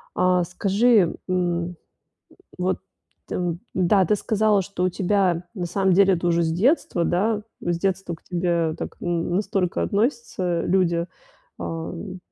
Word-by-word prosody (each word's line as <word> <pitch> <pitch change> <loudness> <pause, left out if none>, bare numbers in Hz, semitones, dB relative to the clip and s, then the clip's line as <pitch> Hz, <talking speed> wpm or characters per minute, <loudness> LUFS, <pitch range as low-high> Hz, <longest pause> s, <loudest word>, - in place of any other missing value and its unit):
А, 180 -1 +3
скажи, 200 +2 +2
м, 175 -1 0 0.8
вот 180 +1 0 0.5
там, 175 -2 -2 0.2
н-да, 185 0 +4
ты 210 - +3
сказала, 215 -1 +2
что 185 -1 -3
у - - +3
тебя 185 -2 +1
на 180 -3 -3
самом 190 +1 +2
деле 195 0 +5
это 175 0 -2
уже 170 0 +2
с 160 - 0
детства, 185 - +2
да, 210 +4 +1 0.2
с 175 -1 -1
детства 190 -1 -1
к 160 - -18
тебе 170 -3 0
так, - - -6
н 175 0 -1
настолько 195 -3 0
относятся 205 - 0
люди, 170 -2 +1 0.5
ам, 175 +3 -5
180 Hz, 140 wpm, -23 LUFS, 170-195 Hz, 0.8 s, деле